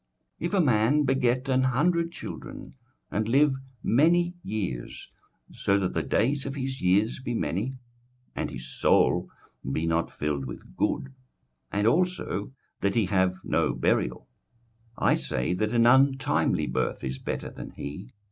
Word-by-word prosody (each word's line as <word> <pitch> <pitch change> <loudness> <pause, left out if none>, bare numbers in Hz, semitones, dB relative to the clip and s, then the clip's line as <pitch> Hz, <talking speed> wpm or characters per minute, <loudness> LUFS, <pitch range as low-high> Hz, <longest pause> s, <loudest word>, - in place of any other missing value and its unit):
21:006:003 170 - -1
If 175 - -8
a 180 -5 +4
man 125 +4 +3
beget 130 -1 +1
an 130 -1 +3
hundred 165 +6 +2
children, - - -8 0.4
and 110 +1 -1
live 140 +3 +4 0.3
many 170 +7 +3
years, 95 - -5 0.4
so 100 - +1
that 95 -2 -1
the - - 0
days 135 +5 0
of 135 - -4
his 135 -1 -4
years 100 +7 +2
be 120 -2 -3
many, 115 +7 -2 0.6
and - - -2
his 65 +1 -8
soul - - +2 0.4
be 80 +4 -1
not 85 0 +1
filled 75 -2 -2
with 65 - -9
good, 135 0 -1 0.6
and 105 +1 0
also 155 - 0 0.3
that 100 0 0
he 115 -3 +3
have 95 -1 +2
no - - +1
burial; 60 -1 0 0.7
I - - +3
say, 65 +8 -1
that 105 +4 -1
an 120 -1 +4
untimely 135 +2 +3
birth - - -2
is 65 0 -4
better - - -4
than - - -8
he. 85 - -7
115 Hz, 150 wpm, -27 LUFS, 95-135 Hz, 0.7 s, a